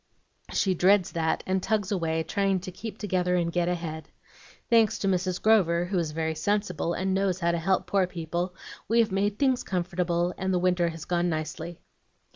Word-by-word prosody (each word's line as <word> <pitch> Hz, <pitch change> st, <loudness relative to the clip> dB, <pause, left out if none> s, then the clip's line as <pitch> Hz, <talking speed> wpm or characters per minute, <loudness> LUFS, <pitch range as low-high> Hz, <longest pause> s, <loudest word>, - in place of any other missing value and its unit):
She 190 Hz, -, +2 dB
dreads 185 Hz, +1 st, +3 dB
that, 160 Hz, -1 st, -1 dB
and 190 Hz, 0 st, 0 dB
tugs 210 Hz, -1 st, 0 dB
away, 165 Hz, -4 st, 0 dB
trying 195 Hz, +2 st, 0 dB
to 185 Hz, -, -7 dB
keep 210 Hz, +3 st, -7 dB
together 180 Hz, -4 st, 0 dB
and 170 Hz, -1 st, 0 dB
get 175 Hz, 0 st, 0 dB
ahead. 165 Hz, -3 st, -4 dB, 0.6 s
Thanks 225 Hz, -3 st, +4 dB
to 195 Hz, -, -2 dB
Mrs. 185 Hz, -1 st, 0 dB
Grover, 175 Hz, -6 st, +3 dB
who 185 Hz, 0 st, -1 dB
is 165 Hz, -2 st, -1 dB
very 160 Hz, +1 st, -2 dB
sensible, 180 Hz, 0 st, -1 dB
and 190 Hz, 0 st, -1 dB
knows 190 Hz, -1 st, +1 dB
how 170 Hz, 0 st, +2 dB
to 170 Hz, -, -1 dB
help 185 Hz, +3 st, +1 dB
poor 195 Hz, -2 st, +1 dB
people, 175 Hz, +1 st, -3 dB, 0.3 s
we 230 Hz, -, +1 dB
have 225 Hz, -3 st, +4 dB
made 200 Hz, +2 st, 0 dB
things 260 Hz, -2 st, +2 dB
comfortable, 175 Hz, -1 st, -1 dB
and 190 Hz, 0 st, -1 dB
the 185 Hz, -, +2 dB
winter 180 Hz, -1 st, +2 dB
has 165 Hz, -1 st, -8 dB
gone 175 Hz, 0 st, 0 dB
nicely. 160 Hz, +1 st, -4 dB
180 Hz, 190 wpm, -27 LUFS, 170-195 Hz, 0.6 s, Thanks